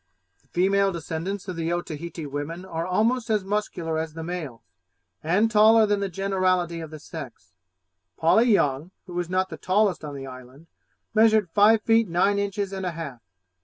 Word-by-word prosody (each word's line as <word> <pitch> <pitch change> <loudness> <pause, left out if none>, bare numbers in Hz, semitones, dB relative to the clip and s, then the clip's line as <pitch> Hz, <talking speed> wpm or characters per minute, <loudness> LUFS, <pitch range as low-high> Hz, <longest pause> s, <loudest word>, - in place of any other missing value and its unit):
The - - -35
female 195 +2 +2
descendants 170 +3 -5
of 185 - -4
the 165 0 -2
Otaheite 170 -1 -4
women 160 +6 -5
are 165 -2 -4
almost 225 +6 +1
as 210 -3 +1
muscular 185 -5 -2
as 160 -1 -5
the 165 - -5
males, 160 -9 -6 0.6
and 200 +8 +2
taller 220 +1 +6
than 205 -1 +1
the 200 -1 -2
generality 185 -2 0
of 160 -1 -7
the 155 - -9
sex. 135 - -10 0.6
Polly 220 +9 +4
Young, 145 -4 +1 0.2
who 175 -1 -5
is 175 -1 -3
not 185 +1 0
the - - -7
tallest 190 -2 +1
on 145 -2 -6
the 135 -1 -7
island, 130 +3 -12 0.5
measured 215 -4 +4
five 215 +3 +5
feet 225 -2 +3
nine 195 +4 +2
inches 200 -1 -2
and 190 -1 -4
a 180 -2 -2
half. 140 -8 -7
180 Hz, 175 wpm, -25 LUFS, 160-200 Hz, 0.6 s, taller